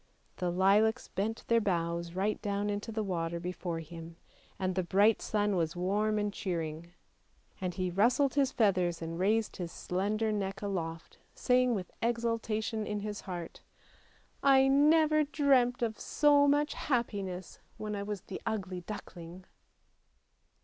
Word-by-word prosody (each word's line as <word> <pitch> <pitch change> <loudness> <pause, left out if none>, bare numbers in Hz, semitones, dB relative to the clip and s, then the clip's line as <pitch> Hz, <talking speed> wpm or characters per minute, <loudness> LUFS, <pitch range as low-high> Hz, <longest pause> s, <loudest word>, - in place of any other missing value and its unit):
The 180 -2 -1
lilacs 205 +6 +3
bent 215 +4 -3
their 230 0 +3
boughs 170 -3 -1
right 200 +3 0
down 205 -1 -1
into 205 +2 -4
the 220 0 -2
water 170 -3 -2
before 175 -1 -4
him, 165 +1 -10 0.4
and 185 -1 -1
the 185 - 0
bright 200 +5 +3
sun 205 -2 0
was 165 -2 0
warm 205 +4 0
and 205 -1 -1
cheering, 170 -4 -4 0.7
and 180 -2 -2
he 185 -2 -1
rustled 245 +8 +3
his 275 -2 +2
feathers 185 -6 +2
and 165 +1 -5
raised 215 +4 +1
his 175 -3 -5
slender 210 +6 -1
neck 195 -1 -3
aloft, 165 -5 -4 0.2
saying 250 -1 +3
with 185 -3 -5
exulta 230 -2 0
tion 220 0 -3
in 210 -1 -2
his 210 0 -5
heart: 175 -3 -7 0.5
" - - -34 0.2
I 265 0 +5
never 305 +2 +5
dreamt 270 -5 +2
of 220 -2 -2
so 290 -1 +4
much 290 +1 +2
happiness 200 - -3 0.2
when 210 -1 -4
I 200 - -3
was 205 -2 -4
the 190 - -8
Ugly 190 -5 -3
Duckling! 180 -3 -8
205 Hz, 150 wpm, -31 LUFS, 180-225 Hz, 0.7 s, I